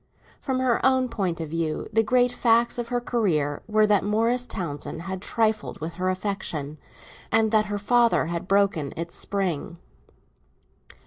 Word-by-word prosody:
From 265 -2 -1
her 250 -3 +1
own 260 -1 +3
point 190 -7 -2
of 160 -2 -4
view 160 -1 -2
the 225 - +5
great 245 +2 +3
facts 235 0 +2
of 240 - -3
her 245 0 0
career 170 - 0
were 215 0 +4
that 210 -2 +3
Morris 230 +4 +1
Townsend 160 -1 -5
had 190 0 -5
trifled 220 0 -1
with 160 +2 -5
her 185 - +2
affection, 185 -6 -3 0.5
and 220 -1 +3
that 215 -1 +3
her 205 -1 -3
father 235 +1 +3
had 170 +2 -4
broken 195 -8 +1
its 170 +1 -5
spring. 180 -4 -3
205 Hz, 155 wpm, -25 LUFS, 170-230 Hz, 0.5 s, the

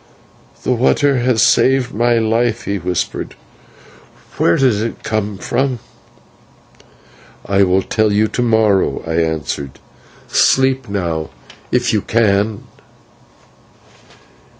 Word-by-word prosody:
"That - - -1
water 135 +3 +2
has 120 -3 +2
saved 130 -1 +2
my 120 +2 +2
life," 115 +1 0
he 100 0 -3
whispered; 90 0 -3 1.0
"where 85 - +3
did 125 -6 +2
it 115 0 -5
come 105 -2 -2
from?" 130 +5 -1 1.7
"I 100 0 +1
will 95 0 +2
tell 110 -1 0
you 105 +2 +2
to 125 - -3
morrow," 110 -4 +1
I 80 0 -2
answered; 75 -4 -3 0.5
"sleep 130 -2 +2
now 85 -6 -3 0.4
if 125 -1 +1
you 105 - +1
can." 105 -1 0
110 Hz, 105 wpm, -17 LUFS, 100-120 Hz, 1.7 s, where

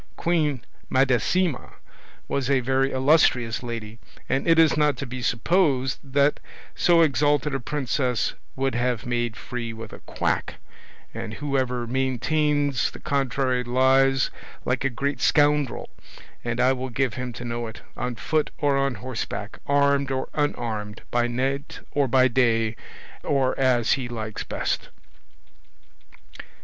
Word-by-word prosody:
Queen 150 -8 0 0.2
Madasima 135 +5 +1 0.5
was 135 -1 -1
a 135 -1 +4
very 135 +2 +1
illustrious 130 -4 +3
lady, 115 -2 -6 0.3
and 135 - 0
it 165 -1 +5
is 165 -1 +5
not 150 -1 +2
to 140 - -4
be 125 0 -6
supposed 135 - +1
that 140 +1 +2 0.3
so 170 -1 +4
exalted 145 -1 +2
a 135 - 0
princess 130 -2 -1 0.2
would 135 0 0
have 120 0 -1
made 120 -2 -1
free 120 -2 -5
with 110 -1 -9
a - - -9
quack; - - -2 0.6
and 110 - -5
whoever 130 -3 -1
maintains 140 +2 +1
the - - -11
contrary 130 -2 0
lies 130 +2 +3 0.3
like 125 0 0
a 135 - +2
great 135 +1 -2
scoundrel, 145 -3 +2 0.6
and 120 0 -2
I 130 +1 +4
will 130 0 -4
give 125 0 0
him 125 -1 -4
to 120 - -7
know 120 0 -3
it, 110 - -10
on 125 -1 -3
foot 155 +8 0
or 145 -2 +2
on 135 -2 0
horseback, 130 -2 -5
armed 140 -1 +3
or 130 -1 -2
unarmed, 110 -7 -2
by 120 0 +2
night 135 +4 -2
or 140 -2 +1
by 130 +1 +5
day, 115 -3 +2 0.5
or 135 -2 +1
as 125 -3 +3
he 130 -3 +1
likes 110 -3 -5
best." - - -2
130 Hz, 140 wpm, -24 LUFS, 120-140 Hz, 0.6 s, it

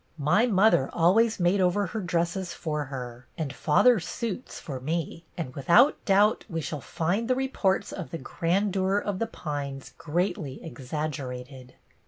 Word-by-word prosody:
My 180 - +3
mother 200 - +4
always 215 +7 +3
made 180 +2 +3
over 185 +3 +2
her 215 +4 -4
dresses 175 0 -1
for 150 -2 -3
her 125 -2 -7
and 150 -4 -3
father's 180 +6 +3
suits 230 +5 -5
for 135 -4 -6
me; 165 +4 -3
and 155 -7 -4
without 170 - +4
doubt 205 +2 +4
we 165 - -2
shall 150 -1 -4
find 185 - -1
the 255 - +2
reports 210 -7 0
of 185 - -6
the 165 - -4
grandeur 190 +6 0
of 205 -2 -2
The 230 - 0
Pines 145 -8 -5
greatly 165 -3 -2
exaggerated." 130 -4 -6
170 Hz, 150 wpm, -27 LUFS, 145-200 Hz, -, mother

